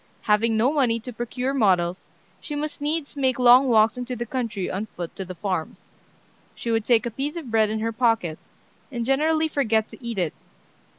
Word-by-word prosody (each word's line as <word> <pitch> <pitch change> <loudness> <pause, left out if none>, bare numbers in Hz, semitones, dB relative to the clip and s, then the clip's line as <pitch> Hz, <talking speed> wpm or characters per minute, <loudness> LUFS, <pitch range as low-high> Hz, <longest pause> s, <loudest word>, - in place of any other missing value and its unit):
Having 220 +1 +2
no 250 +6 +3
money 245 -6 +2
to 245 +2 -8
procure 250 +3 -3
models, 185 -7 +1 0.3
she 295 - -6
must 295 0 -4
needs 300 0 -2
make 260 -3 +1
long 250 +2 +7
walks 225 0 +4
into 250 0 -4
the 240 0 -4
country 230 -6 -3
on 200 +4 -3
foot 175 -4 -7
to 195 - -4
the 185 0 -8
farms. 180 -3 -4 0.6
She 235 - -3
would 225 -1 +1
take 235 -2 +3
a 240 - -2
piece 280 +7 -4
of 310 -9 -6
bread 220 -1 +3
in 215 0 -2
her 225 +1 -1
pocket, 225 -9 +1 0.5
and 240 -3 -3
generally 310 +4 +2
forget 225 -8 +1
to - - -14
eat 235 -2 -4
it. 175 -5 0
235 Hz, 195 wpm, -24 LUFS, 215-265 Hz, 0.6 s, long